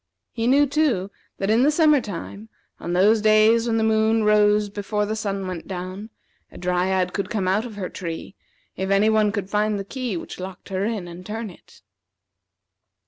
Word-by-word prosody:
He 230 0 -2
knew, 280 +3 +5
too, 275 -10 0 0.3
that 195 +2 0
in 225 +2 +4
the 280 - +5
summer 300 -2 +4
time, 205 +2 -8 0.3
on 175 - -4
those 210 +5 +4
days 215 +2 +4
when 225 -1 +1
the 220 - +1
moon 220 0 +2
rose 210 0 +4
before 205 +1 -2
the 215 +1 -3
sun 200 -3 -3
went 180 -3 -6
down, 185 +3 -6 0.4
a - - -12
Dryad 180 +1 0
could 200 -2 -3
come 195 -4 -1
out 205 +6 +1
of 220 - -11
her 195 -3 -4
tree 170 +1 -6 0.4
if 190 +1 -3
any 200 +2 +4
one 215 -1 +3
could 200 -3 -3
find 210 0 +1
the 195 - -5
key 245 -4 -4
which - - -8
locked 185 +1 -8
her 190 0 -1
in, 210 -5 -3
and 175 +1 -10
turn 215 +1 -5
it. 170 - -20
210 Hz, 195 wpm, -23 LUFS, 190-220 Hz, 0.4 s, knew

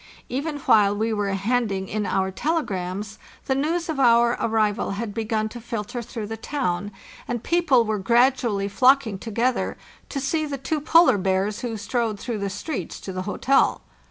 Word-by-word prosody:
Even 290 +4 -2
while 205 -4 +4
we 220 +1 0
were 205 -2 -1
handing 195 -1 0
in 210 0 -2
our 190 0 0
telegrams 205 - -2 0.3
the 265 - +1
news 325 +6 -1
of 315 -4 -3
our 235 -1 +5
arrival 215 -2 +1
had 220 -1 -4
begun 220 0 -1
to 240 +2 -9
filter 230 0 -4
through 225 -1 -6
the 225 +2 -5
town, 205 -7 -2 0.4
and 240 -1 -3
people 310 -9 +3
were 215 -1 -1
gradually 235 -1 +2
flocking 250 -1 +3
together 235 +4 -1 0.3
to 275 - -3
see 310 +4 0
the 280 -1 -4
two 290 +3 -2
polar 325 - +5
bears 190 +2 0
who 230 -3 -3
strode 220 0 -2
through 230 -2 -4
the 200 0 -2
streets 200 - -5
to 190 - -7
the 185 - -3
hotel. 270 +6 +2
225 Hz, 170 wpm, -24 LUFS, 205-265 Hz, 0.4 s, our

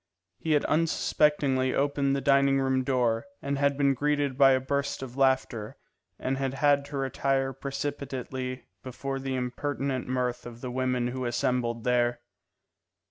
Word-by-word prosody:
He 160 - 0
had 145 - +2
unsuspectingly 150 -4 +2
opened 140 0 +1
the 140 - -1
dining 140 0 +4
room 130 -1 +1
door, 125 -1 +1
and 140 0 -2
had 140 -1 +2
been 140 -1 +3
greeted 145 0 0
by 135 0 +6
a 130 - +3
burst 140 +1 -2
of 125 -2 -8
laughter, 130 -5 +1 0.4
and 135 +1 -2
had 135 -1 -1
had 145 0 +3
to 140 - -6
retire 135 0 0
precipitately 135 -2 -4 0.2
before 135 +1 -4
the 135 0 -3
impertinent 130 +1 -2
mirth 125 -1 -2
of 120 0 -11
the 125 - -4
women 125 -1 0
who 130 +1 -5
were 125 - -1
assembled 120 -1 -1
there. 120 -1 +2
135 Hz, 155 wpm, -28 LUFS, 125-140 Hz, 0.4 s, by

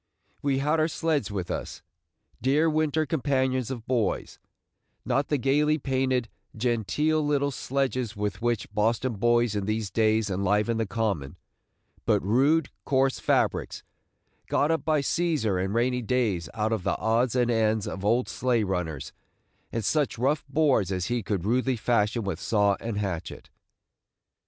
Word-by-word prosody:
We 140 -2 +1
had 150 +4 +1
our 155 - +3
sleds 160 -8 -1
with 95 -4 -4
us, - - -5 0.3
– - - -41
dear 140 +6 +3
winter 155 0 +1
companions 130 -4 0
of 120 -4 -6
boys, 120 -7 -1 0.3
– - - -49
not 140 +1 +1
the 145 - +1
gayly 150 +4 +2
painted, 130 -3 0 0.3
genteel 125 +7 +1
little 140 -1 +1
sledges 130 -4 -2
with 105 +1 -3
which 115 -3 -1
Boston 115 +4 +1
boys 120 +1 +2
in 100 -1 -2
these 110 -1 -2
days 110 -2 +2
enliven 105 +4 +1
the 115 -2 -1
Common, 95 -9 -2 0.7
but - - +4
rude, 135 - +3
coarse 135 -1 +1
fabrics, - - 0 0.6
got 145 +3 +2
up 160 - 0
by 155 -2 +2
Cæsar 140 - 0
in 95 - -2
rainy 125 +3 +1
days 110 - 0
out 110 0 0
of 110 - -1
the - - 0
odds 115 +2 +1
and 120 -1 +2
ends 110 -2 +1
of 95 - -5
old 115 +5 +2
sleigh 125 -3 0
runners 90 -7 -3 0.6
and 115 -3 -3
such 150 -3 +1
rough 140 +5 +1
boards 135 - +2
as 90 -2 -1
he 120 - 0
could 95 -3 -2
rudely 125 +4 +1
fashion 115 0 +1
with 95 -4 -3
saw 100 -2 +2
and 115 -3 -4
hatchet. 95 -5 -4
120 Hz, 155 wpm, -27 LUFS, 105-135 Hz, 0.7 s, but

